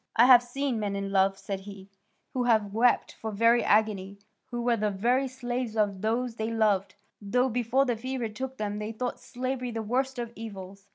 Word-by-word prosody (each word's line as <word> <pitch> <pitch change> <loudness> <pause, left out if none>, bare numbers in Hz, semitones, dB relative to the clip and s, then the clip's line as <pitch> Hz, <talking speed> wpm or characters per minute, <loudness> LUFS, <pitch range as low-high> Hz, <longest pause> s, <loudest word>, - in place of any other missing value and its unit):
I 235 - +7
have 250 -2 +9
seen 245 0 -2
men 205 -2 -2
in 200 0 -3
love," 195 0 +3
said 195 -1 -5
he, 195 -1 -11 0.5
"who 250 -2 0
have 215 -4 +2
wept 240 +3 +2
for 220 - -4
very 230 +3 +3
agony, 200 -2 +1 0.3
who 240 -1 -4
were 240 -1 +3
the 210 -1 0
very 240 +7 +1
slaves 245 -3 -4
of 200 -3 +1
those 230 +2 -1
they 220 0 -2
loved, 205 -4 +1 0.3
though 250 +6 +1
before 245 +3 +1
the 245 -3 0
fever 255 +1 -3
took 260 +5 -6
them 210 0 -3
they 210 +1 -4
thought 245 +2 -3
slavery 255 0 -4
the 225 -1 -4
worst 260 +4 -1
of 235 -1 -4
evils. 195 -3 -9
225 Hz, 195 wpm, -28 LUFS, 205-245 Hz, 0.5 s, have